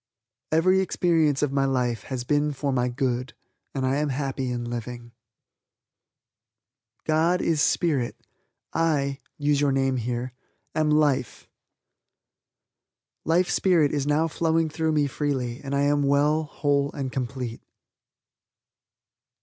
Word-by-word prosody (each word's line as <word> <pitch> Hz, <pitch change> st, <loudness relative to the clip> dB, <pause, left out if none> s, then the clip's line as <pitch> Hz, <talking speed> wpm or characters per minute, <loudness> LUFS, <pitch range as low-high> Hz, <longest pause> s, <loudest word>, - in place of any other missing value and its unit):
Every 185 Hz, +4 st, +4 dB
experience 165 Hz, -6 st, +2 dB
of 145 Hz, -, +1 dB
my 140 Hz, 0 st, +1 dB
life 125 Hz, -4 st, -1 dB
has 130 Hz, -2 st, -4 dB
been 145 Hz, +3 st, +1 dB
for 140 Hz, 0 st, -2 dB
my 125 Hz, -1 st, +1 dB
good 125 Hz, 0 st, -2 dB, 0.4 s
and 135 Hz, -1 st, -1 dB
I 130 Hz, +2 st, +1 dB
am 150 Hz, 0 st, 0 dB
happy 135 Hz, -1 st, -2 dB
in 120 Hz, -1 st, -3 dB
living. 120 Hz, 0 st, -6 dB, 1.9 s
God 165 Hz, +3 st, +2 dB
is 160 Hz, -3 st, +1 dB
Spirit. 145 Hz, -10 st, +1 dB, 0.6 s
I 145 Hz, -4 st, +1 dB, 0.2 s
(use 145 Hz, -1 st, +1 dB
your 145 Hz, -, +3 dB
own 135 Hz, -, +1 dB
name) 125 Hz, -2 st, -1 dB, 0.4 s
am 155 Hz, -1 st, +1 dB
life. 145 Hz, -5 st, +1 dB, 1.8 s
Life 175 Hz, +3 st, +2 dB
Spirit 170 Hz, -6 st, +3 dB
is 145 Hz, -1 st, -1 dB
now 150 Hz, +2 st, +2 dB
flowing 165 Hz, 0 st, +1 dB
through 160 Hz, 0 st, 0 dB
me 150 Hz, -1 st, +2 dB
freely 135 Hz, -3 st, -2 dB
and 140 Hz, 0 st, -3 dB
I 140 Hz, -, +2 dB
am 145 Hz, 0 st, +2 dB
well, 145 Hz, +3 st, +2 dB
whole 145 Hz, -1 st, 0 dB
and 135 Hz, -3 st, -4 dB
complete. 125 Hz, -2 st, -4 dB
140 Hz, 125 wpm, -25 LUFS, 130-155 Hz, 1.9 s, Every